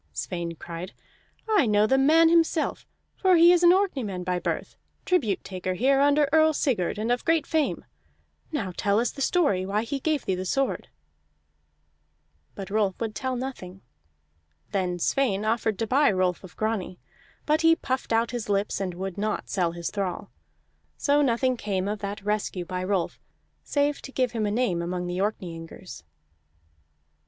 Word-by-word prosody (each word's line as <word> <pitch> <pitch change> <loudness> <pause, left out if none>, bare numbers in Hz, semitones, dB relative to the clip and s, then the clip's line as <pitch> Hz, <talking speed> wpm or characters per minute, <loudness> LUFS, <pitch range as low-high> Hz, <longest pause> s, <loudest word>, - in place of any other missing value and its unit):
Sweyn 170 - -4
cried: 170 +3 -8 0.5
"I 420 - +3
know 210 0 +4
the 265 +5 +3
man 320 +4 +5
himself, 330 -1 +1 0.3
for 375 -2 +3
he 340 +1 +7
is 355 -1 +4
an 345 - +7
Orkneyman 265 - 0
by 180 0 -1
birth, - - -3 0.3
tribute 245 - +1
taker 185 -1 -4
here 270 +6 +3
under 290 +1 +4
Earl 315 0 +5
Sigurd, 225 - 0
and 220 +3 -1
of 245 - 0
great 325 -1 +2
fame. 315 -3 -1 0.7
Now 205 - -3
tell 200 +1 +1
us 235 0 0
the 275 - -8
story 270 - +2
why 205 +3 -1
he 275 +4 -3
gave 305 +1 -1
thee 190 - 0
the 185 0 -3
sword." 270 +8 -1 1.7
But 195 -1 -7
Rolf 205 -3 0
would 225 -2 -3
tell 260 +1 -3
nothing. 215 -8 -6 0.9
Then 180 -2 -1
Sweyn 210 +1 0
offered 220 -2 0
to 225 - -1
buy 280 +6 +3
Rolf 185 -1 0
of 185 - -13
Grani, 215 -5 -2 0.5
but 305 +1 +2
he 330 0 +6
puffed 260 -6 -3
out 230 0 +2
his 240 -4 -4
lips 200 0 0
and 185 -2 -3
would 190 +1 -5
not 215 +1 -2
sell 175 -4 0
his 170 0 -4
thrall. 195 -4 -4 0.7
So 290 0 +2
nothing 255 -1 +1
came 195 -3 -2
of 210 +1 -2
that 200 0 -6
rescue 205 -4 -2
by 180 +1 -4
Rolf, 185 -2 -1 0.4
save 290 0 0
to 270 - -9
give 255 -3 0
him 220 -3 -1
a - - 0
name 205 -7 0
among 180 +1 -3
the 175 +1 -3
Orkneyingers. 175 - -5
215 Hz, 170 wpm, -26 LUFS, 185-275 Hz, 1.7 s, he